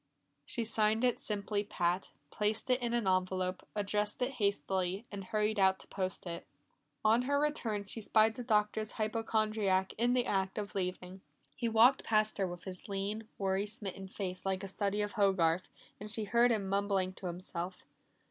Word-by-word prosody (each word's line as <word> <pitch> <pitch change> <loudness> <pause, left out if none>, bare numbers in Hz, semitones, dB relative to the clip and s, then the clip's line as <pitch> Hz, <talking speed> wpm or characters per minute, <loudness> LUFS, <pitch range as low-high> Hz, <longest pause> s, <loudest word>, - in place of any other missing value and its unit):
She 235 - -1
signed 220 +1 +2
it 250 -1 +2
simply 205 0 -1
"Pat", 180 -2 0 0.2
placed 215 +4 0
it 250 0 +3
in 240 -1 0
an 235 -4 0
envelope, 185 0 0
addressed 210 0 -1
it 250 - 0
hastily, 200 -3 -1
and 200 -2 -6
hurried 215 +1 0
out 190 0 +5
to - - -13
post 190 -1 -3
it. 170 -1 -6 0.6
On 225 +3 +5
her 285 +3 +1
return 230 -9 -1
she 225 +3 -3
spied 220 +1 +4
the 245 - -6
Doctor's 215 -1 +1
hypochondriac 215 -3 +1
in 240 +1 +3
the 250 -1 +2
act 190 -1 0
of 205 -1 -3
leaving. 185 0 -3 0.3
He 235 - -1
walked 235 +4 +5
past 215 -1 +2
her 190 - +2
with 175 0 -7
his 185 +1 -8
lean, 200 +3 -3
worry 195 +1 0
smitten 200 -3 -5
face 185 -1 -5
like 190 0 -1
a - - -3
study 200 +1 0
of 205 - -3
Hogarth, 185 -5 +2 0.3
and 210 +1 -7
she 220 0 -3
heard 235 +4 +4
him 210 -4 +1
mumbling 195 -1 +1
to 185 - -6
himself. 180 +1 -5
205 Hz, 175 wpm, -33 LUFS, 190-220 Hz, 0.6 s, out